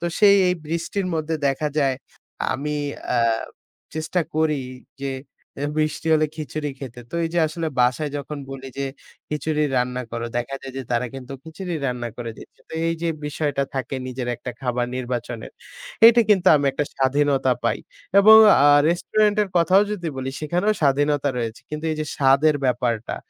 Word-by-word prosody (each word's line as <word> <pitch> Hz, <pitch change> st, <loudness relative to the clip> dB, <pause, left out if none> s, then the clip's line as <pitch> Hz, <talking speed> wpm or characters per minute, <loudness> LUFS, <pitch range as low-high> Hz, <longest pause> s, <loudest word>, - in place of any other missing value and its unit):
তো 175 Hz, -, -2 dB
সেই 200 Hz, -1 st, +7 dB
এই 180 Hz, -, +2 dB
বৃষ্টির 170 Hz, +4 st, -2 dB
মধ্যে 160 Hz, 0 st, -1 dB
দেখা 145 Hz, +3 st, -1 dB
যায় 135 Hz, -3 st, +2 dB, 0.6 s
আমি 150 Hz, +3 st, -3 dB, 0.3 s
অ্যা 120 Hz, -, +1 dB, 0.7 s
চেষ্টা 160 Hz, +3 st, -1 dB
করি 155 Hz, -3 st, +1 dB, 0.4 s
যে 140 Hz, 0 st, -2 dB, 0.5 s
এ -, -, 0 dB
বৃষ্টি 155 Hz, +1 st, -1 dB
হলে 155 Hz, 0 st, +4 dB
খিচুড়ি 150 Hz, 0 st, -4 dB
খেতে। 125 Hz, -3 st, -8 dB
তো -, -, -9 dB
এই -, -, -1 dB
যে -, -, +2 dB
আসলে 160 Hz, +1 st, -4 dB
বাসায় 125 Hz, +4 st, +1 dB
যখন 145 Hz, +1 st, -6 dB
বলি 135 Hz, 0 st, -7 dB
যে 140 Hz, -, -1 dB, 0.4 s
খিচুড়ি 150 Hz, 0 st, -1 dB
রান্না 125 Hz, 0 st, 0 dB
করো 115 Hz, 0 st, -3 dB
দেখা 120 Hz, +3 st, -2 dB
যায় 135 Hz, -, -8 dB
যে 135 Hz, -, -3 dB
তারা 120 Hz, +1 st, +1 dB
কিন্তু 135 Hz, 0 st, -8 dB
খিচুড়ি 170 Hz, +2 st, -6 dB
রান্না 125 Hz, -2 st, -3 dB
করে 120 Hz, -2 st, -5 dB
দিচ্ছে। -, -, -15 dB
তো -, -, -14 dB, 0.2 s
এই 165 Hz, -, 0 dB
যে 170 Hz, -, +1 dB, 0.2 s
বিষয়টা 145 Hz, -2 st, -1 dB
থাকে 130 Hz, 0 st, -3 dB
নিজের 125 Hz, -1 st, -4 dB
একটা 125 Hz, -, -6 dB
খাবার 125 Hz, -1 st, -1 dB
নির্বাচনের, 120 Hz, -2 st, -4 dB, 0.5 s
এটি 235 Hz, +1 st, +7 dB
কিন্তু 190 Hz, -3 st, +3 dB
আমি 145 Hz, -, 0 dB
একটা 150 Hz, -, -1 dB
স্বাধীনতা 135 Hz, 0 st, +2 dB
পাই। -, -, +1 dB, 0.4 s
এবং 220 Hz, +2 st, +9 dB, 0.3 s
আ -, -, +7 dB, 0.2 s
রেস্টুরেন্টের 210 Hz, +4 st, +2 dB
কথাও 185 Hz, +4 st, +5 dB
যদি 175 Hz, -5 st, -3 dB
বলি 130 Hz, 0 st, -3 dB
সেখানেও 175 Hz, +7 st, +1 dB
স্বাধীনতা 145 Hz, 0 st, +2 dB
রয়েছে। 115 Hz, -1 st, -4 dB
কিন্তু 155 Hz, +1 st, -5 dB
এই 155 Hz, -, -4 dB
যে 155 Hz, -, -1 dB
স্বাদের 140 Hz, +3 st, +4 dB
ব্যাপারটা 120 Hz, -3 st, -1 dB
145 Hz, 170 wpm, -23 LUFS, 130-160 Hz, 0.7 s, এবং